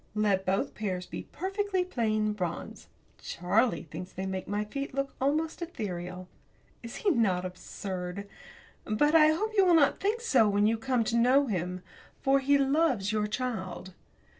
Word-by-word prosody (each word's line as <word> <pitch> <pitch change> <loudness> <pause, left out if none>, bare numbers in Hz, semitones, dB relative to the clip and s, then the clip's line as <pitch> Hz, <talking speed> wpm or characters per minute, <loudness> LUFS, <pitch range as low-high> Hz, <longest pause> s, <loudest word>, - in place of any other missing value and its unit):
Let 200 -3 +1
both 190 +1 0
pairs 185 -4 -3
be - - -7
perfectly 385 +1 -1
plain 215 - 0
bronze. 180 -5 -5 0.3
Charlie 180 - +1
thinks 165 +4 -8
that - - -24
they 190 - -3
make 190 -1 -4
my 205 +1 -1
feet 275 +4 -5
look 275 0 -2
almost 310 +5 0
ethereal. 180 - -5 0.5
Is 230 -1 -8
he 400 - +5
not 190 - +1
absurd? 185 +1 -6 0.6
But 295 +9 +2
I 310 -2 +7
hope 340 +8 +1
that 435 - -7
you 395 - +7
will 345 - +6
not 290 -4 +4
think 430 +4 0
so, 245 - +4
when 205 +1 +2
you 225 +1 +2
come 255 -1 +1
to 230 +1 -1
know 255 +4 +4
him, 180 -4 -3 0.4
for 275 0 +3
he 280 +1 +3
loves 275 -7 +2
your 210 -1 0
child. 195 -6 -4
220 Hz, 170 wpm, -29 LUFS, 190-285 Hz, 0.6 s, I